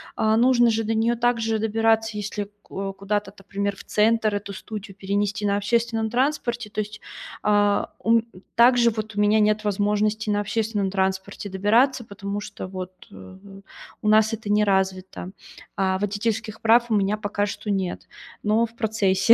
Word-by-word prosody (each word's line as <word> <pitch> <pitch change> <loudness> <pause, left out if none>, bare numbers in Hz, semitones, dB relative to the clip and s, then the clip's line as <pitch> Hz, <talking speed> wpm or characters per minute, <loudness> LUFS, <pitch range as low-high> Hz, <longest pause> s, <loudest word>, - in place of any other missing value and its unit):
а, 220 0 +2
нужно 240 0 +5
же 225 0 0
до 225 +1 -1
неё 225 +2 +2
также 230 -2 +1
добираться, 225 0 +1
если 205 0 -4
ко 195 0 -5
куда-то, 200 +2 -2
например, 200 +1 -3
в - - -12
центр 215 0 +2
эту 205 0 -4
студию 200 0 -8
перенести 200 +1 -1
на 200 0 +2
общественном 225 +1 0
транспорте. 240 -2 -1
То 215 - -5
есть, 210 0 -4 0.4
а, 205 -1 +2
у 225 - 0
м 225 - -8 0.3
также 240 0 +5
вот 215 -1 -5
у - - -2
меня 210 +1 +4
нет 215 0 +2
возможности 210 +1 0
на 205 0 +2
общественном 210 -1 -1
транспорте 190 +1 -2
добираться, 230 +6 +2
потому 200 0 -5
что 205 -2 -7
вот, 185 -1 -6 0.2
э, 95 - -12 0.6
у 210 - -2
нас 215 +1 +5
это 220 -2 -5
не 210 +1 +4
развито. 190 -2 -1 0.4
А 190 -1 +1
водительских 215 +2 -2
прав 235 +2 +4
у 220 - +2
меня 200 +1 +1
пока 205 -1 -1
что 205 +1 -6
нет, 190 -3 -2 0.4
но 215 +2 +3
в 230 - -12
процессе. 210 -1 +3
210 Hz, 170 wpm, -24 LUFS, 200-225 Hz, 0.6 s, нужно